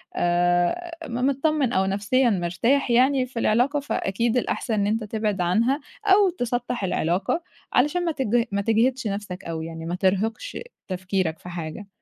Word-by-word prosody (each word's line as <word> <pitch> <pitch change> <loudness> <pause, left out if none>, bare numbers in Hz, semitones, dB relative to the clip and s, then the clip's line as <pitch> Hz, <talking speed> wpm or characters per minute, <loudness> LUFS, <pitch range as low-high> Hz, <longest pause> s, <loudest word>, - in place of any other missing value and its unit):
آآ 175 - +1 0.2
م 235 - -5
متطمّن 280 -1 +1
أو 190 0 +2
نفسيًا 205 +6 +2
مرتاح 220 +8 +1
يعني 260 +2 +4
في 250 -2 -6
العلاقة 245 +7 +2
فأكيد 235 -3 -1
الأحسن 235 -1 -1
إن 205 -1 +1
أنت 220 +1 0
تبعد 210 -2 -2
عنها، 230 +11 +2 0.3
أو 395 0 +5
تسطّح 245 - -2
العلاقة 185 - 0 0.3
علشان 350 +4 +2
ما 330 - +1
تجه 240 -4 +1
ما 200 0 0
تجهدش 230 +3 +1
نَفْسك 200 -2 -5
أو 165 -1 -4
يعني 165 0 -7
ما 175 - -2
ترهِقش 200 - -1 0.3
تفكيرك 185 -3 -2
في 180 - -10
حاجة. 170 +3 -6
220 Hz, 155 wpm, -24 LUFS, 185-260 Hz, 0.3 s, أو